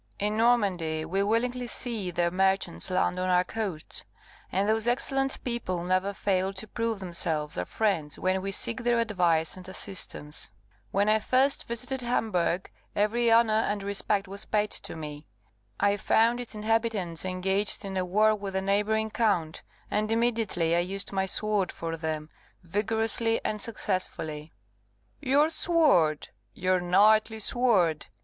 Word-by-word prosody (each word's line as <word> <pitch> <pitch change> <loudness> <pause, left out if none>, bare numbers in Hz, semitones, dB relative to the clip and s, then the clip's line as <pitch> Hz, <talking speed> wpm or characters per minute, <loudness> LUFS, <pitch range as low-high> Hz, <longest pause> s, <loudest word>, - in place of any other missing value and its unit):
In 210 +1 -1
Normandy 190 -9 +1
we 190 +5 -1
willingly 245 +4 0
see 230 -6 -2
their 175 0 0
merchants 190 +1 +1
land 180 0 0
on 185 0 -1
our 180 0 +4
coasts, 190 -5 -4 0.5
and 195 +2 0
those 220 +1 +1
excellent 270 +2 +1
people 215 -8 -3
never 185 +2 0
fail 190 -1 -1
to 195 +3 -4
prove 230 0 -2
themselves 165 -5 -1
our 90 - -2
friends 170 - -1
when 185 0 0
we 195 - -3
seek 230 +5 +2
their 240 0 +2
advice 175 -8 +1
and 185 0 -10
assistance. 185 -6 -2 0.4
When 200 +1 +1
I 215 +1 +4
first 265 +5 +2
visited 250 +3 -1
Hamburgh, 190 -7 0 0.3
every 230 +3 +2
honour 225 -1 +5
and 210 -2 0
respect 200 0 -1
was 200 +1 -4
paid 210 0 0
to - - -4
me. 150 -1 -8 0.5
I 200 0 +2
found 230 +3 +2
its 245 -3 -6
inhabitants 215 -6 -1
engaged 190 +3 0
in 195 -1 -5
a 185 - 0
war 210 +4 +3
with 200 -2 -5
a 190 - +1
neighbouring 215 +2 0
count, 190 -9 0 0.3
and 215 +1 0
immediately 225 -8 +1
I - - +3
used 195 +3 -2
my 190 -1 -1
sword 210 -2 +1
for 165 0 -5
them, 155 -1 -4 0.3
vigorously 220 +4 0
and 215 -1 -2
successfully." 165 -8 -4 0.7
"Your 285 +2 +3
sword! 285 - +3 0.3
your 185 0 +1
knightly 215 +5 +3
sword!" 200 -9 +2
200 Hz, 150 wpm, -27 LUFS, 180-225 Hz, 0.7 s, honour